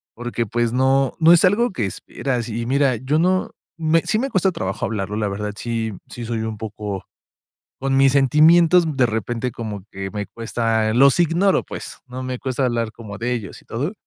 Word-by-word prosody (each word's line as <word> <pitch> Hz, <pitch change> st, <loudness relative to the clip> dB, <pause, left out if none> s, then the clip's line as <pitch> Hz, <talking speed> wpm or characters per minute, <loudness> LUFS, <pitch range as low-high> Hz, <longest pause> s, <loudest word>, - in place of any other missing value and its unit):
Porque 120 Hz, 0 st, -3 dB
pues, 120 Hz, +1 st, -1 dB
no 135 Hz, +1 st, +2 dB
no 165 Hz, +1 st, +6 dB
es 175 Hz, -, +5 dB
algo 210 Hz, +5 st, +3 dB
que 115 Hz, -, -2 dB
esperas. 120 Hz, +4 st, -4 dB
Y 115 Hz, +1 st, -3 dB
mira, 135 Hz, 0 st, +2 dB
yo 135 Hz, +7 st, 0 dB
no 185 Hz, +2 st, +1 dB, 0.3 s
me 165 Hz, +1 st, +3 dB
Sí 215 Hz, -, 0 dB
me 270 Hz, +3 st, -1 dB
cuesta 190 Hz, -4 st, +2 dB
trabajo 95 Hz, -, -3 dB
hablarlo. 105 Hz, -1 st, -3 dB
La 105 Hz, -1 st, 0 dB
verdad 105 Hz, +1 st, -4 dB
sí, 115 Hz, -2 st, -3 dB, 0.2 s
sí, 120 Hz, -, -7 dB
soy 115 Hz, -1 st, -2 dB
un 110 Hz, -1 st, -4 dB
poco 105 Hz, -2 st, -5 dB, 0.7 s
Con 135 Hz, 0 st, 0 dB
mis 135 Hz, -1 st, +5 dB
sentimientos, 160 Hz, +5 st, +5 dB
de 130 Hz, -2 st, +4 dB
repente 115 Hz, +2 st, -2 dB
como 105 Hz, -4 st, -6 dB
que 95 Hz, 0 st, -5 dB
me 105 Hz, -1 st, -4 dB
cuesta 115 Hz, -1 st, -1 dB
Los 135 Hz, +4 st, +5 dB
ignoro 175 Hz, +4 st, +3 dB
pues. -, -, -8 dB
No 130 Hz, +1 st, -6 dB
me 130 Hz, -1 st, -3 dB
cuesta 130 Hz, 0 st, -1 dB
hablar 115 Hz, -2 st, -1 dB
como 105 Hz, -3 st, -9 dB
de 125 Hz, +2 st, -1 dB
ellos, 110 Hz, -6 st, -6 dB
y -, -, -26 dB
todo. 145 Hz, -, -3 dB
120 Hz, 195 wpm, -21 LUFS, 110-140 Hz, 0.7 s, no